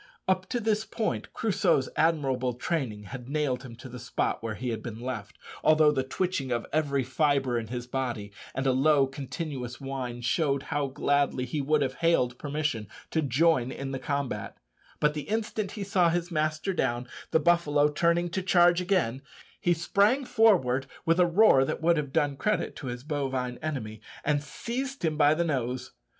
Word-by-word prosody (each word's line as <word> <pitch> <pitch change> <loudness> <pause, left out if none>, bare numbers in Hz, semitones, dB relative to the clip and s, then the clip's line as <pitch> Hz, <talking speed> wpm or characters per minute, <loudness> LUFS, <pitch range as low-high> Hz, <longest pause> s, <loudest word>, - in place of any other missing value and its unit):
Up 185 0 +1
to 245 - -1
this 220 -1 +1
point 220 0 -3
Crusoe's 185 - +1
admirable 135 -6 +1
training 125 -5 -2
had 125 +4 -8
nailed 140 -4 0
him 125 -3 -10
to 120 +2 -10
the 125 0 -9
spot 120 - -2
where 110 -1 -3
he 125 +4 -4
had 115 - -3
been 115 -2 -7
left, 120 -5 -5 0.3
although 155 -1 +6
the 135 -3 0
twitching 135 0 -2
of 120 -1 -1
every 140 -3 +1
fibre 135 -1 +1
in 110 - -6
his 120 +1 -5
body 125 -5 -3 0.2
and 135 +1 -1
a 135 - +4
low 140 +2 +4
continuous 135 -2 -5
whine 130 -3 -5
showed 140 +2 +1
how 145 -1 +1
gladly 140 -1 +1
he 145 +4 -2
would 145 +1 +2
have 130 -1 -2
hailed 125 -8 +2
permission 145 -7 -2 0.2
to 160 - +1
join 140 -1 +2
in 135 0 -5
the 135 - -3
combat; 140 -2 -3 0.4
but 150 0 +3
the 150 -1 -6
instant 215 -2 -2
he 210 - -4
saw 190 -3 +3
his 175 +1 -1
master 155 +4 0
down, 120 -7 0
and - - -18 0.2
the 160 - +3
buffalo 150 -3 +3
turning 170 +3 +1
to 190 - -1
charge 175 -1 +4
again, 175 -10 0 0.4
he 175 - +1
sprang 205 - +2
forward 170 - +3 0.2
with 165 +2 +3
a 180 - +5
roar 170 -6 +6
that - - -2
would 165 +1 +3
have 145 -3 -2
done 145 0 +1
credit 210 +9 -1
to 135 - -7
his 120 0 -5
bovine 135 -4 -2
enemy, 110 -9 -4 0.2
and 145 -1 +2
seized 255 - -4
him 155 -1 +1
by 150 0 +4
the 170 +2 +1
nose. 130 -5 -2
145 Hz, 185 wpm, -28 LUFS, 130-170 Hz, 0.4 s, although